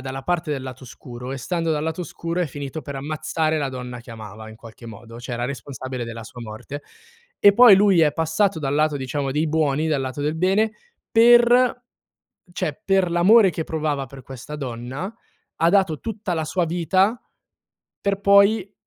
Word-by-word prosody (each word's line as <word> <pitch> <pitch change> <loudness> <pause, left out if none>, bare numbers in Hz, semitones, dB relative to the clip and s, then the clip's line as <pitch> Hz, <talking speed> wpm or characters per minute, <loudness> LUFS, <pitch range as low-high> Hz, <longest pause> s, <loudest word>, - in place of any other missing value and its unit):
dalla 135 +1 -6
parte 175 0 -1
del 135 -3 -4
lato 130 0 -9
oscuro 125 +1 -9
e - - -4
stando 165 +3 -2
dal 150 -1 -1
lato 160 +2 -3
oscuro 170 0 -5
è 175 - +1
finito 145 +2 -6
per 140 - -7
ammazzare 155 +2 -2
la 140 -2 -1
donna 125 -2 -7
che 120 - -14
amava 110 0 -10
in 110 - -11
qualche 115 +1 -13
modo, 115 0 -11
cioè 125 0 -5
era 120 0 -3
responsabile 130 -1 -6
della 115 0 -7
sua 120 - -11
morte. 115 +6 -8 0.6
E 205 - +7
poi 235 -1 +8
lui 195 -3 +4
è 150 -2 +4
passato 165 +4 0
dal 135 -1 -2
lato 150 0 +2
diciamo 135 0 -3
dei 155 +3 0
buoni, 155 0 +1
dal 150 -3 0
lato 130 +2 -4
del 150 +2 -1
bene, 195 +6 +2 0.4
per 240 +2 +5 0.7
cioè, 175 -2 -3
per 190 -2 +2
l'amore 190 +4 +5
che 160 0 -4
provava 150 -4 -2
per 135 0 -12
questa 135 +4 -9
donna, 130 - -5 0.4
ha 165 - +3
dato 185 -5 +2
tutta 220 -4 -4
la 160 -1 -2
sua 175 +3 0
vita 185 - +1 0.8
per 200 -1 -1
poi 200 0 +4
155 Hz, 185 wpm, -22 LUFS, 130-185 Hz, 0.8 s, poi